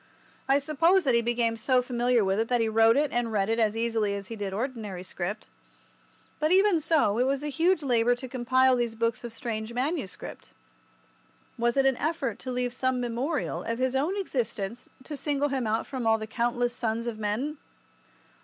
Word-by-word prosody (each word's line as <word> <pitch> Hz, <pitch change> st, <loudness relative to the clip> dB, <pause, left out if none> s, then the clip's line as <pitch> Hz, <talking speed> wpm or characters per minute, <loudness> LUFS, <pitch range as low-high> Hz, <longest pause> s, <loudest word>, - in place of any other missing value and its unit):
I 270 Hz, -, +6 dB
suppose 325 Hz, +6 st, +3 dB
that 265 Hz, -4 st, +2 dB
he 235 Hz, -, +4 dB
became 235 Hz, -1 st, 0 dB
so 250 Hz, +3 st, +2 dB
familiar 245 Hz, -2 st, +1 dB
with 190 Hz, +2 st, +1 dB
it 225 Hz, -, +1 dB
that 245 Hz, 0 st, +1 dB
he 225 Hz, -, +2 dB
wrote 225 Hz, +2 st, +4 dB
it 295 Hz, -1 st, +1 dB
and 240 Hz, -1 st, -1 dB
read 200 Hz, -1 st, 0 dB
it 225 Hz, +1 st, +1 dB
as 220 Hz, -1 st, +1 dB
easily 225 Hz, -3 st, 0 dB
as 200 Hz, -1 st, -7 dB
he 230 Hz, -, -5 dB
did 200 Hz, -3 st, -4 dB
ordinary 215 Hz, -4 st, -4 dB
script. 185 Hz, +3 st, -5 dB, 0.9 s
But 310 Hz, +2 st, +1 dB
even 385 Hz, -2 st, +5 dB
so, 290 Hz, -9 st, +2 dB
it 250 Hz, -, +3 dB
was 275 Hz, +1 st, 0 dB
a 295 Hz, -, -2 dB
huge 330 Hz, +4 st, +2 dB
labour 245 Hz, -2 st, +3 dB
to 255 Hz, +1 st, -8 dB
compile 255 Hz, +1 st, +3 dB
these 240 Hz, -2 st, -1 dB
books 230 Hz, +1 st, -1 dB
of 240 Hz, -, -6 dB
strange 225 Hz, -1 st, -5 dB
manuscript. 265 Hz, -, -4 dB, 1.0 s
Was 235 Hz, +1 st, 0 dB
it 270 Hz, -, +4 dB
an 265 Hz, -2 st, +3 dB
effort 295 Hz, -8 st, -2 dB
to 255 Hz, -, -5 dB
leave 250 Hz, -1 st, -1 dB
some 260 Hz, 0 st, 0 dB
memorial 245 Hz, +5 st, -2 dB
of 230 Hz, 0 st, -3 dB
his 260 Hz, +1 st, 0 dB
own 310 Hz, +9 st, 0 dB
existence 235 Hz, -, -3 dB
to 295 Hz, -, -6 dB
single 290 Hz, 0 st, 0 dB
him 265 Hz, -4 st, -1 dB
out 220 Hz, +1 st, 0 dB
from 255 Hz, -4 st, -3 dB
all 225 Hz, 0 st, +4 dB
the 220 Hz, -, -5 dB
countless 240 Hz, +2 st, -1 dB
sons 230 Hz, -1 st, -2 dB
of 230 Hz, -2 st, -4 dB
men? 230 Hz, +9 st, -2 dB
240 Hz, 200 wpm, -27 LUFS, 225-270 Hz, 1.0 s, I